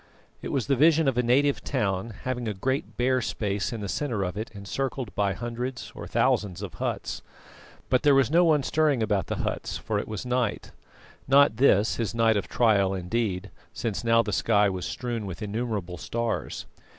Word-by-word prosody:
It - - -5
was 135 -4 0
the 140 - +2
vision 160 +2 +4
of 135 - +2
a 125 - +3
native 135 +4 +2
town, 105 -4 -1
having 125 -2 -2
a 105 - -2
great 130 +8 -2
bare 130 +1 +2
space 105 0 -2
in 115 -3 -5
the 100 - -3
centre 115 -2 -1
of 90 0 -3
it 110 +2 -4
encircled 120 +4 -4
by 100 -2 +1
hundreds 120 +4 -5
or - - -8
thousands 95 -2 +1
of 95 - -6
huts. - - -3 0.7
But 130 - +2
there 145 -2 +5
was 135 -1 +3
no 170 +2 +5
one 155 -4 +3
stirring 145 -5 +2
about 100 -5 0
the - - -2
huts, - - -3
for - - -2
it - - -5
was 110 +1 -5
night 125 -3 -1 0.6
not 140 -4 +5
this 110 -5 +4
his 115 -1 -2
night 115 -1 +3
of 100 - -1
trial 100 -5 +2
indeed, 95 +1 -2 0.2
since 115 -4 -3
now 115 0 +4
the 105 -2 -3
sky 100 0 +3
was 90 -1 -4
strewn 120 -4 -4
with 95 +3 -6
innumerable 105 -5 -3
stars. 115 +3 -3
115 Hz, 190 wpm, -26 LUFS, 100-130 Hz, 0.7 s, there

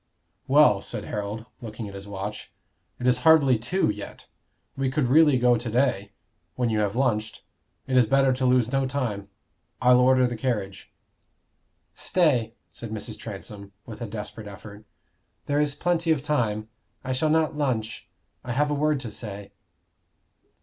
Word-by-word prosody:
"Well," 135 -8 +5
said - - -5
Harold, 105 +2 -5 0.2
looking 110 -1 -7
at 100 - -9
his 100 +1 -9
watch, 100 +1 -6 0.5
"it 125 - -4
is 125 0 +3
hardly 140 -5 +5
two 180 +12 0
yet. 105 0 -9 0.5
We 135 -1 -1
could 130 -2 0
really 150 -1 +5
go 125 -1 +4
to 120 0 -5
day, 110 -5 0 0.4
when 120 -2 0
you 110 - +1
have 105 -1 0
lunched. 110 -5 -1 0.4
It 130 - -2
is 125 -3 +5
better 135 +1 +3
to 130 +1 -1
lose 125 -2 +3
no 135 -1 +1
time. 115 -7 -3 0.5
I'll 125 -1 +5
order 130 0 +4
the 120 -1 -2
carriage." 105 -6 -3 1.0
"Stay," 125 -11 +1 0.2
said 115 - -8
Mrs. 110 0 -6
Transome, 100 -1 -9
with 115 +1 -10
a 120 - -3
desperate 105 0 -7
effort. 105 +1 -11 0.6
"There 145 +1 +1
is 145 -1 0
plenty 170 +1 0
of 145 -4 +1
time. 110 -8 -1 0.4
I 130 0 -2
shall 155 +5 +1
not 160 0 +2
lunch. 115 -8 -2 0.3
I 125 - -4
have 145 +3 +1
a - - +1
word 150 0 +1
to 115 -4 -6
say." 100 -2 -7
125 Hz, 165 wpm, -25 LUFS, 105-135 Hz, 1.0 s, Well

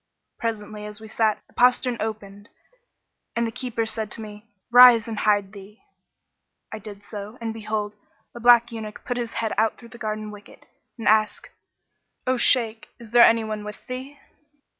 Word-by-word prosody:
Presently, 210 -2 -4
as 210 0 -9
we 220 - -11
sat, 220 0 0
the - - -28
postern 250 0 +3
opened 205 -1 -6 0.9
and 235 0 +1
the 225 - -3
keeper 245 -2 -3
said 220 -1 -4
to 230 - -6
me, 210 0 -10 0.2
'Rise 245 -2 +8
and 220 -2 -4
hide 205 -2 +2
thee.' 205 +2 -13 0.9
I 220 - -5
did 205 -1 -11
so; 210 +2 -8
and 225 -1 -4
behold, 215 -1 -3 0.4
a 240 - -9
black 240 0 +5
eunuch 220 -2 -8
put 245 - -2
his 235 -2 -4
head 225 -1 -2
out 220 0 +1
through 235 - -14
the 235 +1 -13
garden 215 0 -4
wicket 205 -1 -15 0.3
and 225 - -5
asked, 215 0 +2 0.8
'O 255 - +2
Shaykh, 230 -2 +3
there 235 +1 +2
any 230 -1 +6
one 215 -1 -5
with 210 0 -9
thee?' 260 +3 -7
220 Hz, 170 wpm, -24 LUFS, 210-235 Hz, 0.9 s, Rise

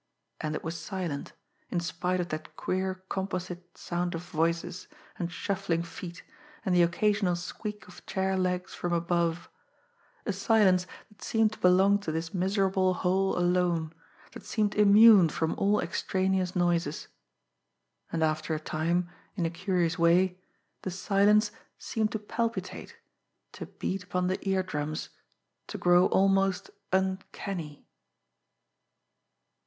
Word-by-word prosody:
And 155 0 -2
it - - -5
was 165 +1 -4
silent, 180 -8 -4 0.4
in 175 - 0
spite 180 +2 -1
of 175 -1 -2
that 155 0 -6
queer 185 0 -2
composite 185 -2 -5
sound 175 0 -2
of 165 - -5
voices, 170 +1 -2 0.3
and 170 -1 -2
shuffling 185 -3 -1
feet, 170 0 -9 0.4
and 190 - +1
the 175 - +5
occasional 185 +2 +2
squeak 210 +4 -6
of 180 - -14
chair 190 0 0
legs 180 0 -1
from 175 -1 -2
above 170 0 0 0.8
a 205 - 0
silence 195 -2 +3 0.2
that 210 -1 -23
seemed 225 -1 +2
to - - -12
belong 190 +3 +5
to 180 -6 -4
this 165 +1 -3
miserable 190 0 +1
hole 190 +2 +1
alone, 175 -2 +1 0.4
that - - -10
seemed 210 -2 0
immune 210 -3 +7
from 160 +1 -1
all 205 +1 +3
extraneous 185 +1 0
noises. 170 -4 0 1.0
And 165 -1 0
after 155 0 0
a - - -3
time, 170 +3 -1 0.3
in 175 -4 -1
a 165 - -1
curious 175 -2 0
way, 180 +2 +3 0.4
the - - -3
silence 205 +3 +3 0.3
seemed 220 -1 -1
to - - 0
palpitate, 230 +2 -4 0.6
to - - -8
beat 195 +1 -4
upon 180 0 -1
the 185 - -1
ear 190 -1 +2
drums, 155 -3 -4 0.6
to - - -5
grow 175 +1 +5
almost 195 0 +2 0.2
uncanny. 190 -4 -2
180 Hz, 135 wpm, -29 LUFS, 170-195 Hz, 1.0 s, immune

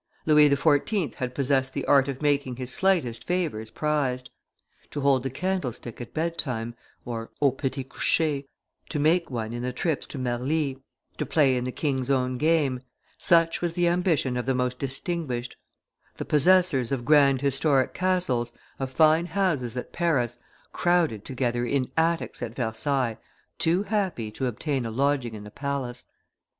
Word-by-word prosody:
Louis 150 -1 +6
XIV. 150 +5 +2
had 125 -2 -4
possessed 135 -1 +1
the - - -2
art 140 -1 +5
of 140 +1 -5
making 140 -3 +1
his 125 +1 -5
slightest 170 -12 +1
favors 160 -12 -2
prized; 130 -4 -1 0.6
to 145 - -4
hold 135 -2 +3
the 135 - -3
candlestick 130 - -3
at 120 - -8
bedtime 140 -8 -2 0.3
(au 120 +4 -1
petit 135 0 -3
coucher), 145 +2 0 0.5
to 155 - -2
make 165 +4 +2
one 115 -3 -4
in 120 - -4
the 125 +1 -2
trips 150 +4 -2
to - - -7
Marly, 130 +3 -1 0.4
to - - 0
play 140 -5 +3
in 125 0 -1
the 125 - -2
king's 130 -2 -1
own 130 -2 +1
game, 150 -5 +2 0.4
such 165 -2 +3
was 175 -2 -1
the 175 0 +2
ambition 170 -8 +1
of 125 - -3
the 135 - +2
most 125 0 -1
distinguished; 135 -2 -3 0.6
the - - -4
possessors 150 -5 +3
of 125 -3 -2
grand 140 -3 +5
historic 140 0 +2
castles, 175 -11 0 0.3
of 135 -1 -2
fine 160 +4 +4
houses 150 - 0
at 125 - -6
Paris, 125 -9 0 0.3
crowded 170 - +1
together 120 -2 -1
in 130 +1 -1
attics 165 +1 0
at 120 -1 -5
Versailles, 120 0 -1 0.4
too 175 +4 +2
happy 190 - -1
to 130 +4 -2
obtain 130 +3 -2
a 115 - -3
lodging 130 -1 0
in 105 - -8
the 105 - -10
palace. 140 -3 -4
135 Hz, 160 wpm, -26 LUFS, 125-160 Hz, 0.6 s, Louis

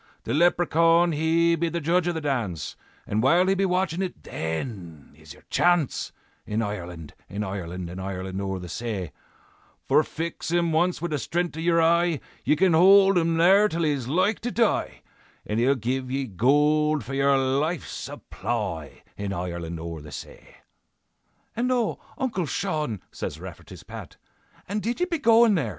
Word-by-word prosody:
"'The - - -3
Leprechaun 170 +1 +4
he 165 +2 +2
be 170 +1 -1
judge 170 +2 +1
of 175 - 0
the 160 - -3
dance, 115 - -2 0.3
And 105 +2 0
while 170 +9 +4
he 190 - +3
be 195 0 +1
watchin' 180 -1 0
it, 185 -2 -5
then 80 - -5
is 80 0 -14
your - - -19
chance, 175 -5 +2 0.3
In 110 +2 -2
Ireland, 90 -6 -6 0.2
in 100 +3 -3
Ireland, 90 -3 -5
In 90 +2 -7
Ireland 95 0 -4
o'er 95 -1 -2
the 90 -1 -7
say; 100 -3 -4 0.8
For 145 +3 +5
fix 165 +2 -5
him 170 0 +1
once 175 +2 +1
wid 175 - -2
the 150 - 0
stren'th 175 +3 -2
of 160 - -5
your 170 0 +3
eye, 170 -1 +3 0.2
Ye - - +3
can 185 +2 +3
hold 195 +3 +7
him 165 -1 +2
there 195 +5 +6
till 170 -2 -2
he's 140 -6 0
like 185 - +1
to 245 - -3
die, 230 -2 0 0.4
And 105 +2 -1
he'll 130 +4 +3
give 130 +2 -2
ye 135 +1 -1
gold 150 - +2
for 135 - -7
your 140 0 +3
life's 140 +6 0
supply, 95 -11 -5
In 100 -1 -3
Ireland 85 -2 -4
o'er 85 -1 -6
the 75 0 -11
say.'" - - -11 1.0
"And 250 +3 0
oh! 240 -4 0 0.2
Uncle 205 -10 -1
Shaun," 150 - -2
says - - -5
Rafferty's - - -10
Pat, - - -10 0.5
"And 210 +2 -2
did 235 +7 -2
ye 360 - +2
be 340 -3 -2
goin' 230 -3 +5
there? 150 - 0
150 Hz, 170 wpm, -25 LUFS, -, 1.0 s, hold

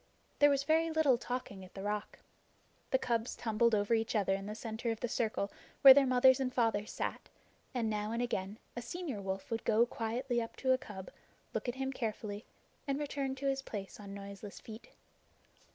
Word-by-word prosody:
There 290 - +7
was 280 -1 +2
very 320 +2 +3
little 310 -6 +3
talking 245 -7 -4
at 185 - -14
the 195 - -6
Rock. 210 +1 -3 0.7
The 265 - +4
cubs 235 -2 -1
tumbled 230 0 +2
over 205 +2 +1
each 225 0 +1
other 195 -2 +2
in 195 +1 -3
the 210 - -4
center 225 +1 -4
of 225 -1 -2
the 245 - -1
circle 220 -4 -1 0.3
where 270 -1 +13
their 275 0 +5
mothers 255 +1 +6
and 260 -1 0
fathers 225 -4 +1
sat, - - -4 0.4
and 245 -4 -1
now 210 0 -1
and 230 - -1
again 210 -4 -2 0.2
a 240 - -3
senior 275 - -4
wolf 190 +3 -4
would 225 0 -1
go 225 +2 +4
quietly 240 +2 -1
up 230 - -6
to 260 - +1
a - - +3
cub, 200 -8 -8 0.4
look - - -2
at 245 - -3
him 265 0 -2
carefully, 215 -3 -4 0.4
and 275 0 0
return 275 -2 -2
to 275 +1 -6
his 270 0 +1
place 200 -7 -7
on 200 -1 -9
noiseless 200 0 -8
feet. 220 +1 -11
230 Hz, 200 wpm, -34 LUFS, 210-265 Hz, 0.7 s, where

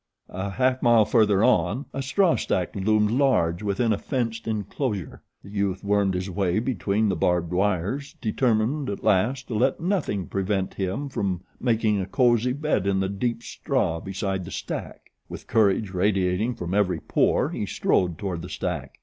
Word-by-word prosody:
A 95 +2 -4
half 130 +5 +1
mile 120 -3 +5
further 105 -3 +3
on 110 - +2
a 135 - -3
straw 170 +7 +2
stack 90 -2 -1
loomed 105 +2 +2
large 115 -10 +2
within 105 +3 +1
a 100 - -2
fenced 115 -4 -3
enclosure. 105 - -3 0.2
The 100 - -12
youth 100 -2 -1
wormed 100 -2 +1
his 90 +1 -2
way 95 -1 0
between 110 -3 0
the 95 - +1
barbed 90 +1 0
wires 105 - -1
determined 120 +4 0
at 100 - -5
last 110 +6 +1
to - - -3
let 125 +5 +1
nothing 165 - -1
prevent 95 0 -2
him 95 +9 -3
from 95 -8 -2 0.2
making 110 -4 +1
a 95 - -4
cozy 120 -1 +2
bed 145 -9 0
in 95 -1 +2
the 95 0 0
deep 115 +4 -2
straw 100 - -1
beside 95 0 -3
the - - -8
stack. - - -6 0.2
With - - -8
courage 105 -2 +2
radiating 95 +4 +1
from 90 -2 -5
every 95 -4 +1
pore - - +1
he - - -3
strode 90 -3 +1
toward 90 -5 -4
the 90 - -8
stack. - - -4
105 Hz, 170 wpm, -25 LUFS, 95-120 Hz, 0.2 s, mile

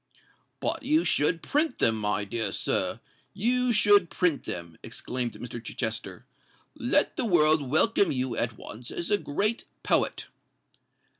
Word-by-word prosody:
"But - - -2
you 310 +5 +2
should 165 +3 +1
print 300 -1 0
them, 115 - +3
my 105 -1 -1
dear 105 0 -2
sir—you 245 - -1
should 205 -5 +4
print 170 -6 0
them," 85 -2 -6
exclaimed 120 +2 -3
Mr. 120 -1 -8
Chichester. 110 -1 -4 0.5
"Let - - +1
the - - +1
world 155 - +3
welcome 200 - +3
you 130 -3 -2
at 115 -2 -2
once 120 +1 -9
as 170 - -4
a 205 - +3
great 210 +10 -1 0.2
poet." - - +1
145 Hz, 135 wpm, -27 LUFS, -, 0.5 s, should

